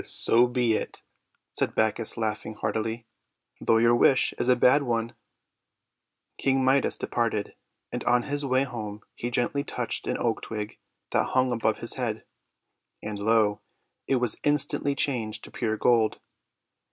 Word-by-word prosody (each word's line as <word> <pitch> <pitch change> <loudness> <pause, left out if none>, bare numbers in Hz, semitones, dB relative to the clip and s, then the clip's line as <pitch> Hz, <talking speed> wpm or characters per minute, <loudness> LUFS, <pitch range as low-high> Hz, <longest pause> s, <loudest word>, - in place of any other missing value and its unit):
"So 120 +2 +3
be 120 -2 +1
it," - - -4 0.5
said - - -1
Bacchus, 110 +1 0
laughing 110 -1 -3
heartily, 110 +2 -2 0.5
"though 115 - +3
your 115 +1 +5
wish 130 +2 +4
is 120 - 0
a 125 - +6
bad 125 +4 +5
one." 115 -3 -1 1.3
King 135 -1 +2
Midas 135 +1 +2
departed, 115 -3 -1 0.4
and - - -4
on 120 0 +3
his 145 +2 -2
way 130 -1 +2
home 110 -5 -6
he 120 - -4
gently 125 +3 0
touched - - -4
an - - 0
oak 115 -2 -1
twig 105 -1 -6 0.3
that - - +3
hung 130 -1 +3
above 115 -2 +1
his 115 - -3
head. 110 -3 -2 0.8
And, 105 -1 -4
lo! 105 -1 +2 0.5
it 135 - +2
was 125 -3 -1
instantly 145 -1 0
changed 120 -6 -1
to - - -11
pure 110 -3 -2
gold! 115 -2 +3
120 Hz, 150 wpm, -27 LUFS, 110-130 Hz, 1.3 s, a